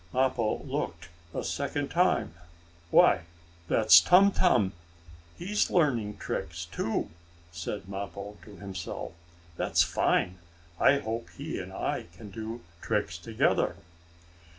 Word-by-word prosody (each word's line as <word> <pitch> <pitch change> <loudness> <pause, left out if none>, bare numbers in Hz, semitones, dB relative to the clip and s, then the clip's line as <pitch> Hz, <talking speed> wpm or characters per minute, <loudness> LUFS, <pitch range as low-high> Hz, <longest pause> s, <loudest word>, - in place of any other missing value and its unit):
Mappo 130 -4 +1
looked 85 +1 -4 0.2
a - - -4
second - - -2
time. - - +2 0.6
"Why, 85 - +5 0.4
that's 110 +3 +7
Tum 195 +3 +6
Tum! 105 - +3 0.6
He's 205 +4 0
learning 120 - +1
tricks 85 +1 -4
too!" 110 +6 -2 0.4
said 90 +4 -5
Mappo, 100 +1 -6
to 105 - -12
himself. 95 -4 -6 0.5
"That's - - +3
fine! 90 +1 +1 0.4
I 140 - +5
hope 115 -3 -4
he - - -4
and - - -7
I - - -3
can 105 -3 -10
do 110 +3 -6 0.2
tricks 105 -6 -1
together." 110 +6 +1
105 Hz, 115 wpm, -29 LUFS, 95-120 Hz, 0.6 s, that's